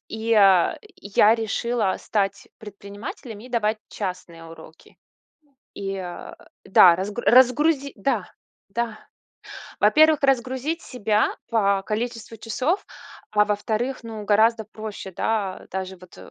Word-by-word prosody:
и 220 - -7
я 205 -5 +4 0.2
я 210 +2 +3
решила 225 -2 -1
стать 195 -2 -2
предпринимателем 205 +2 -9
и 250 - -12
давать 220 -3 0
частные 180 -4 -6
уроки. 160 -1 -15 0.8
И, 195 -1 -5
а, 180 -2 -8 0.3
да, 180 -3 +7
раз 190 +3 -4
разгруз 255 +6 +4 0.2
да, 275 - -2 0.4
да, 235 -2 -3 0.8
во-первых, 310 -1 +5
разгрузить 265 +5 0
себя, 215 -3 0
по 200 -4 +1
количеству 225 +1 -4
часов, 260 - -2 0.5
а, 210 0 +3
во-вторых, 220 +5 -2
ну, 220 -2 -7
гораздо 220 +2 +3
проще, 215 -2 -8
да, 200 -1 -2
даже 190 0 -5
вот 180 0 -16
215 Hz, 115 wpm, -23 LUFS, 195-235 Hz, 0.8 s, да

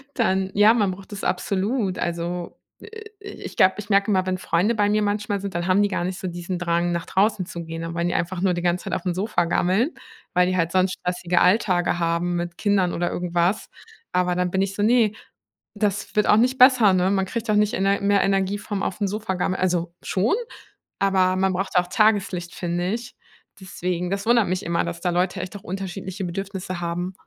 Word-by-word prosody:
Dann 190 -5 +1
ja, 210 +2 +6
man 205 -5 +1
braucht 190 +2 -11
das 200 - -7
absolut. 195 +2 -1
Also, 170 +1 -4 0.2
äh, - - -11 0.3
äh, 405 0 -9 0.2
ich - - -8
glaube, 185 - +5
ich 210 0 -8
merke 200 +1 +3
immer, 185 -1 +2
wenn 185 0 -1
Freunde 190 +6 +1
bei 205 -1 +2
mir 210 +1 +2
manchmal 205 0 -1
sind, 200 -2 -6
dann 175 0 -2
haben 190 +2 +4
die 205 - +3
gar 185 - -2
nicht 185 +1 -3
so 185 - -4
diesen 175 +1 -4
Drang 170 0 0
nach 170 -1 -2
draußen 200 0 +1
zu 170 -1 -7
gehen, 165 0 -6
dann 165 0 -5
wollen 170 0 0
die - - -2
einfach 175 +1 -2
nur 190 -1 +2
die 175 - -3
ganze 175 0 0
Zeit - - -4
auf'm 180 0 -1
Sofa 190 -2 0
gammeln, 190 - +1 0.4
weil 180 0 +3
die 185 0 0
halt 170 -1 +1
sonst 185 0 +2
stressige 180 -1 0
Alltage 180 -3 +2
haben 170 +1 0
mit 175 0 -4
Kindern 195 -4 +1
oder 175 +1 -1
irgendwas. 175 +2 0 0.4
Aber 180 0 +1
dann 180 0 0
bin 190 +1 +1
ich 195 0 -2
so: 205 - -1
„Ne, 225 -1 +4 0.6
das 205 -1 -2
wird 210 - +3
auch 210 - +6
nicht 255 +3 +2
besser, 250 -5 +7
ne?“ 185 +1 +2
Man 190 -1 +1
kriegt 235 +4 -4
doch 215 - +3
nicht 210 0 +2
Ener 195 +1 +1
mehr 200 0 +3
Energie 195 0 +1
vom 205 -1 -4
auf'm 200 +2 -1
Sofa 210 -1 -3
gammeln. 185 +1 -1
Also, 175 -2 0
schon, 200 - +1 0.6
aber 190 -2 +2
man 190 0 +1
braucht 190 +1 -3
auch 180 0 +3
Tageslicht, 195 -4 +1
finde 175 +1 -2
ich. 240 +2 -6 0.4
Deswegen 180 -2 -3
das 200 +1 -2
wundert 235 -3 +4
mich 185 +1 -2
immer, 170 0 0
dass 170 0 -5
da 180 - 0
Leute 180 +1 0
echt 185 +2 -7
auch 195 - -16
unterschiedliche 190 +1 -5
Bedürfnisse 185 0 -5
haben. 175 +2 -3
185 Hz, 220 wpm, -23 LUFS, 175-205 Hz, 0.6 s, besser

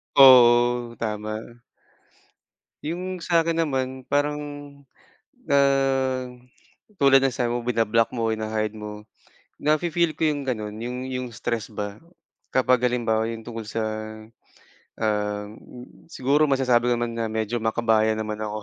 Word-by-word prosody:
Oo, 120 -2 +6
tama. 110 -1 -3 1.5
Yung 180 +3 -4
sa 170 -1 +3
akin 165 0 +1
naman, 130 -2 -3
parang 145 +1 +1 1.1
na 140 - +2 1.4
tulad 135 -2 +5
ng 135 - +3
sabi 120 0 -1
mo, 120 - -2
bina-block 115 -1 +1
mo, 115 -2 -1
hina-hide 110 -1 -2
mo. 105 -1 -8 0.6
Nafi-feel 160 +2 +1
ko - - -1
yung 150 -2 +1
gano'n, 110 -4 -3
yung 125 +2 -4
yung 130 -1 -4
stress 115 0 -3
ba, 105 -1 -6 0.5
kapag 130 -1 +2
halimbawa 115 -2 0
'yon 115 -1 -6
tungkol 115 -2 -7
sa, 115 +1 -2 1.2
um, 105 -1 -1 0.6
siguro 145 0 +1
masasabi 125 -3 +2
ko - - +3
naman 120 0 -2
na 115 - -1
medyo 110 +1 -2
makabayan 110 -1 +2
naman 110 -1 -4
ako. 105 0 -4
120 Hz, 125 wpm, -24 LUFS, 110-135 Hz, 1.5 s, Oo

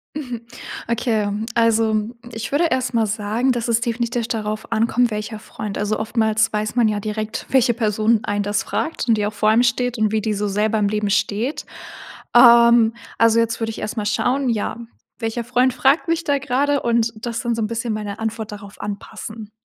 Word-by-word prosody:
Mhm, 250 -6 -5 0.5
okay, 230 -3 0 0.2
also, 225 -2 +2 0.3
ich 225 0 -5
würde 300 +5 +2
erst 255 -1 0
mal 225 -1 +3
sagen, 215 +4 0
dass 240 -2 -2
es 230 -1 +2
definitiv 235 -1 -1
darauf 215 -2 -4
ankommt, 230 +1 +2
welcher 210 +1 -4
Freund. 210 -1 -6
Also, 210 +1 -1
oftmals 220 0 +1
weiß 215 +1 -2
man 240 -3 +4
ja 210 -1 0
direkt, 215 +1 -4
welche 255 -2 +3
Person 220 0 +1
einen 205 -1 -1
das 205 +1 -1
fragt 315 -5 -3
und 230 - +4
die 210 - 0
auch 215 - -5
vor 215 +1 +2
einem 225 +2 +5
steht 245 0 0
und 215 -1 +2
wie 220 0 +1
die 215 0 -1
so 205 +1 -1
selber 210 +2 +1
im 205 - +2
Leben 210 -1 -1
steht. 215 +7 -1 0.7
Ähm, 235 -1 +7 0.3
also, 230 0 +5
jetzt 230 0 0
würde 225 -1 -2
ich - - -8
erst 215 - -5
mal 210 - -1
schauen, 250 +5 +1
ja, 220 0 -1 0.4
welcher 225 +1 -2
Freund 250 +2 +2
fragt 275 +8 +2
mich 335 0 0
da 285 -2 +1
grade 280 +1 +1
und 230 -1 +1
das 235 -1 -3
dann 240 -1 -1
so 230 - -2
'n 215 - 0
bisschen 230 0 -3
meine 210 -1 -4
Antwort 220 -1 -4
darauf 205 -1 -10
anpassen. 210 +1 -7
225 Hz, 200 wpm, -21 LUFS, 215-240 Hz, 0.7 s, Ähm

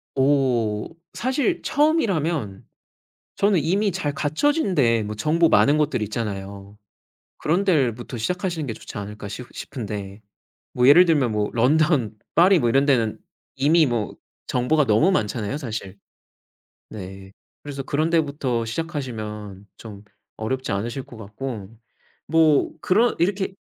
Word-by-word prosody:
어. 130 -6 +1 0.3
사실 275 +8 -1
처음이라면 175 - 0 0.7
저는 200 -3 +3
이미 195 +7 +1
잘 150 -5 -2
갖춰진 195 - 0
데 115 -7 +3
뭐 105 0 -5
정보 160 +9 +2
많은 145 -1 +4
곳들 150 -5 0
있잖아요. 100 -2 -5 0.6
'그런 175 +6 +1
데부터 125 - 0
시작하시는 175 - -2
게 120 - -3
좋지 110 - -11
않을까.' 100 0 -7
싶 120 +5 -7
싶은데. 105 -4 -6 0.5
뭐 125 +1 +3
예를 175 +6 +8
들면 150 -8 +2
뭐 105 -1 -1
런던 130 -2 +2 0.2
파리 180 +3 +6
뭐 120 - +1
이런 135 +4 +3
데는 120 -6 +1 0.4
이미 155 +4 +4
뭐 120 -5 -2 0.3
정보가 135 +4 +1
너무 110 - +4
많잖아요 110 - -1
사실. 110 -8 -6 0.9
네. 95 -1 -9 0.3
그래서 140 -2 -6
그런 155 +4 0
데부터 140 -7 0
시작하시면 110 - -5
좀 105 -3 -11 0.3
어렵지 130 +4 -3
않으실 115 +7 -3
것 120 - -13
같고. 110 -1 -7 0.6
뭐 160 -2 +3
그런 225 +6 +2
이렇게 190 +2 0
130 Hz, 270 characters per minute, -23 LUFS, 110-160 Hz, 0.9 s, 예를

